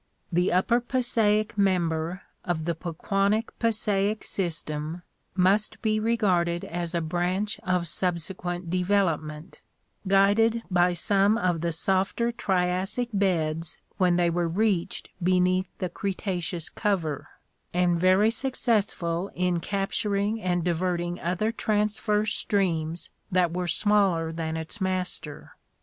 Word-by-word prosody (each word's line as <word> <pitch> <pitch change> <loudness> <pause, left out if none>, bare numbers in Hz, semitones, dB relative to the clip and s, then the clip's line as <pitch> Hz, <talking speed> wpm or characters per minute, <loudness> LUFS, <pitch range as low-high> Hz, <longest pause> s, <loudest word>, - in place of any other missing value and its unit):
The 180 +2 +2
upper 210 +7 +3
Passaic 225 -4 +1
member 175 -2 0 0.2
of 165 -3 -2
the 170 - 0
Pequannock 195 +6 -1
Passaic 215 -2 +1
system 160 -2 -2 0.3
must 205 +4 +3
be 215 -1 +2
re 230 +2 +1
garded 175 -5 +1
as 170 0 -4
a 170 - +1
branch 180 +6 -1
of 180 -2 0
subsequent 175 0 -2
development, 170 -4 -1 0.5
guided 205 +4 +4
by 180 0 +3
some 200 +4 +2
of 180 -6 0
the 170 0 0
softer 190 +7 +1
Triassic 190 +3 0
beds 165 -5 0 0.2
when 180 -3 +3
they 175 -1 +2
were 170 0 0
reached 185 0 -1
beneath 185 +1 +2
the 185 - -2
Cretaceous 180 -2 -3
cover, 180 -9 -2 0.4
and 180 0 +2
very 185 +5 +4
successful 205 -8 0
in 180 -1 +1
capturing 200 +3 -1
and 175 -2 0
diverting 175 0 -1
other 185 +6 -1
transverse 210 -1 0
streams 170 -5 -1 0.2
that 180 -2 +2
were 180 0 -2
smaller 190 -5 +2
than 160 0 -3
its 160 +7 -5
master. 185 -5 -3
185 Hz, 120 wpm, -26 LUFS, 170-205 Hz, 0.5 s, guided